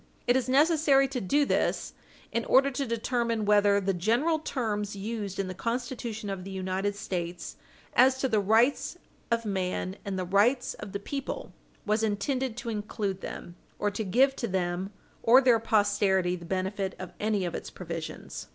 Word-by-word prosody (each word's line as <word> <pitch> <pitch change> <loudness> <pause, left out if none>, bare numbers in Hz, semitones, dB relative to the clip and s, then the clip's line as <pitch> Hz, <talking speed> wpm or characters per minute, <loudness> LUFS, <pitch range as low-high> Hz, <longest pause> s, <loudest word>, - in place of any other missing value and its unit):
It 245 - +3
is 260 -1 0
necessary 290 -1 +4
to 260 -2 -3
do 285 +10 +2
this - - 0 0.4
in 230 - 0
order 275 +2 +4
to 275 +1 -2
determine 230 -1 -1
whether 205 -1 +4
the 195 0 0
general 235 - +1
terms 210 -9 -2
used 205 -1 -4
in 195 - -1
the 185 - -4
Constitution 235 0 -3
of 195 -2 -4
the 195 - -8
United 190 +1 -2
States 175 -3 -4 0.4
as 260 +1 +5
to 265 - 0
the 220 -4 +2
rights 225 +7 +2 0.3
of 230 0 0
man 185 -1 -2
and 195 -2 -3
the 185 - -2
rights 210 +8 +2
of 195 - -9
the 200 - -2
people 275 +6 -5 0.3
was 215 +1 +1
intended 230 +4 -1
to 240 -1 -4
include 205 -3 -3
them, 175 - -7 0.2
or 205 - 0
to 210 +2 -3
give 260 +8 +3
to 235 - -2
them 185 0 -2 0.3
or 245 +3 +7
their 250 -4 +4
posterity 205 -4 +2
the 170 -1 -9
benefit 190 +2 -2
of 185 -2 -8
any 210 -3 0
of 175 - -3
its - - -5
provisions. 165 -3 -7
210 Hz, 175 wpm, -28 LUFS, 190-245 Hz, 0.4 s, or